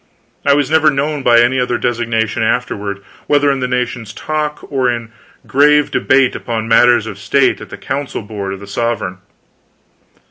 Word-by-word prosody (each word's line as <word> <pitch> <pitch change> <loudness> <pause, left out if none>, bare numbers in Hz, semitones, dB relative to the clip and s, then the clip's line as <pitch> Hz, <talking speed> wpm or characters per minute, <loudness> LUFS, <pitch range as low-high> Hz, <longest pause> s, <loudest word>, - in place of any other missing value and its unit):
I 140 0 +4
was 145 0 0
never 160 -1 +5
known 145 +1 -1
by 120 -2 +5
any 125 +2 +2
other 125 -1 0
designation 115 -2 -1
afterward, 105 -4 -2 0.2
whether 145 -1 +3
in 135 - -1
the 125 - -1
nation's 125 -3 -3
talk 150 -1 -3
or 130 -3 +1
in 115 -2 -4 0.3
grave 150 +2 +3
debate 135 -1 +2
upon 115 -2 -4
matters 120 0 +4
of 105 -3 -7
state 130 +7 +1
at - - -10
the - - -8
council 135 -3 -4
board 100 -2 -5
of 95 - -8
the - - -8
sovereign. 100 -3 -3
125 Hz, 170 wpm, -16 LUFS, 110-140 Hz, 0.3 s, never